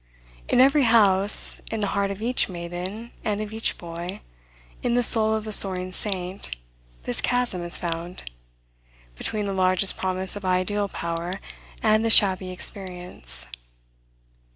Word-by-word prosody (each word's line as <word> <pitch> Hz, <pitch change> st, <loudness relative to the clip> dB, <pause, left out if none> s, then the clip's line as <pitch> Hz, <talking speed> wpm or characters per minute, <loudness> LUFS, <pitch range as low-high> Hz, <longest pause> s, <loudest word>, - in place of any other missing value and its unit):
In -, -, +2 dB
every 275 Hz, +3 st, +4 dB
house, 205 Hz, -4 st, +5 dB
in 225 Hz, -1 st, -4 dB
the -, -, 0 dB
heart 200 Hz, -1 st, -1 dB
of 200 Hz, +2 st, -7 dB
each 245 Hz, -1 st, +1 dB
maiden, 180 Hz, +6 st, -7 dB
and 210 Hz, -1 st, -2 dB
of 215 Hz, 0 st, -6 dB
each 220 Hz, +1 st, -1 dB
boy, 170 Hz, +1 st, -8 dB, 0.6 s
in 240 Hz, -1 st, -1 dB
the 245 Hz, -, +1 dB
soul 220 Hz, -1 st, +3 dB
of 220 Hz, -, -4 dB
the 215 Hz, -, -7 dB
soaring 185 Hz, -2 st, +4 dB
saint, 185 Hz, -, -5 dB, 0.5 s
this 120 Hz, -, -2 dB
chasm 245 Hz, -7 st, -1 dB
is 175 Hz, 0 st, +2 dB
found, 170 Hz, +1 st, -6 dB, 0.9 s
between 210 Hz, -, -3 dB
the 200 Hz, -, -3 dB
largest 185 Hz, 0 st, +3 dB
promise 185 Hz, 0 st, 0 dB
of 205 Hz, -, -8 dB
ideal 185 Hz, +3 st, -1 dB
power, 170 Hz, +1 st, -5 dB, 0.4 s
and 215 Hz, 0 st, +2 dB
the 225 Hz, -, 0 dB
shabby 190 Hz, -4 st, +4 dB
experience. 180 Hz, -, -3 dB
195 Hz, 145 wpm, -23 LUFS, 180-215 Hz, 0.9 s, house